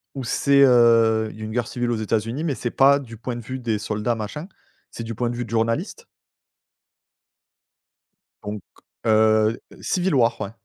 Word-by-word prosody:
où 135 - -4
c'est 140 +3 +2
heu, 115 -3 +4
une 110 0 -7
guerre 120 0 -1
civile 120 -1 -2
aux - - 0
États-Unis, 115 +6 -2
mais 150 -6 -1
c'est 120 - -4
pas 140 +1 +5
du 115 -5 -10
point 120 +2 -5
de 120 - -6
vue 130 +3 -6
des 115 -4 -2
soldats 105 +2 -2
machin, 115 - -6 0.4
c'est 115 - -7
du 115 0 -6
point 120 +2 -1
de 120 - -4
vue 120 0 -4
de - - -14
journalistes. 115 0 -2 2.4
Donc, 105 -1 -6 0.4
heu, 110 0 +3 0.2
Civil 180 -2 0
War, 115 -3 +2
ouais. 100 - -4
115 Hz, 170 wpm, -22 LUFS, 110-125 Hz, 2.4 s, pas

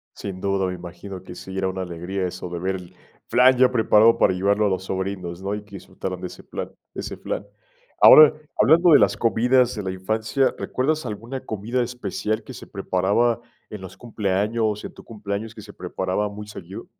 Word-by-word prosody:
Sin 95 -2 -6
duda. 95 -1 0
Me 90 - -3
imagino 90 +2 -9
que 90 - -10
sí, 95 0 -8
era 95 0 0
una 95 0 -4
alegría 90 +2 -3
eso 90 0 -7
de 85 -1 -5
ver 95 +2 -1
el 90 -1 -10 0.3
flan 125 +1 +5
ya 130 0 +5
preparado 110 -1 +5
para - - +3
llevarlo 100 +3 +2
a - - +1
los 95 -1 -2
sobrinos, 95 -2 -4
¿no?, 100 +2 -2
y 105 - -7
que 100 -1 -13
disfrutaran 90 0 -6
de - - -3
ese - - -12
plan - - -6 0.2
ese - - -6
flan. 100 - -4 0.5
Ahora, 155 -1 +9 0.3
hablando 170 +3 +6
de 145 - +8
las - - +3
comidas 125 +2 +3
de 105 - -3
la 95 - -3
infancia, 110 +8 0
¿recuerdas 150 +3 -1
alguna 115 +4 -5
comida 115 +4 -2
especial 110 -2 -3
que 130 - -10
se 125 - -11
preparaba 100 +5 +1 0.3
en 105 -2 -8
los 95 - -10
cumpleaños, 105 0 -1
en - - -8
tu - - -14
cumpleaños, 105 0 -5
que 110 - -9
se 105 0 -12
preparaba 95 +3 -2
muy 105 +1 -9
seguido? 95 -2 -9
100 Hz, 200 wpm, -23 LUFS, 95-115 Hz, 0.5 s, Ahora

